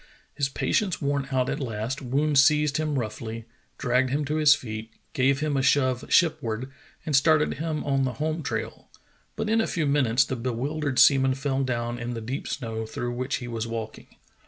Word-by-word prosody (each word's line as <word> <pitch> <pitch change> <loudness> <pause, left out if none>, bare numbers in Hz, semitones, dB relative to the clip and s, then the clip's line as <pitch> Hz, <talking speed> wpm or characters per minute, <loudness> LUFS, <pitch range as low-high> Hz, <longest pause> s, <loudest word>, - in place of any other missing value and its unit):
His 140 -2 -1
patience 185 +7 0
worn 140 -1 -1
out 130 -1 +1
at 145 - -2
last, 120 +1 -3
Woon 145 +4 0
seized 150 0 +4
him 155 -1 -1
roughl}^, 110 -1 -4 0.3
dragged 125 0 +1
him 145 +3 -1
to 150 +3 -1
his 150 -2 +6
feet, 110 -3 -7 0.2
gave 135 +2 +2
him 150 -2 0
a 135 - +2
shove 130 -2 +2
ship 160 -3 +4
ward, 120 +2 -4 0.3
and 150 - 0
started 150 +2 +4
him 155 -1 -2
on 135 -1 +1
the 130 -1 -1
home 155 +2 -2
trail, - - -5 0.5
but 220 0 -3
in 225 +1 +3
a - - -1
few 165 -4 -1
minutes 135 -4 +3
the 130 - -3
bewildered 130 +4 -2
seaman 135 -2 +5
fell 135 0 -1
down 120 -2 -2
in 120 0 -4
the - - -4
deep 125 +5 -4
snow 110 -4 -4
through 120 +2 -4
which 125 +1 -2
he 120 - -5
was 115 -1 -3
walking. 115 -1 -6
135 Hz, 195 wpm, -26 LUFS, 120-150 Hz, 0.5 s, his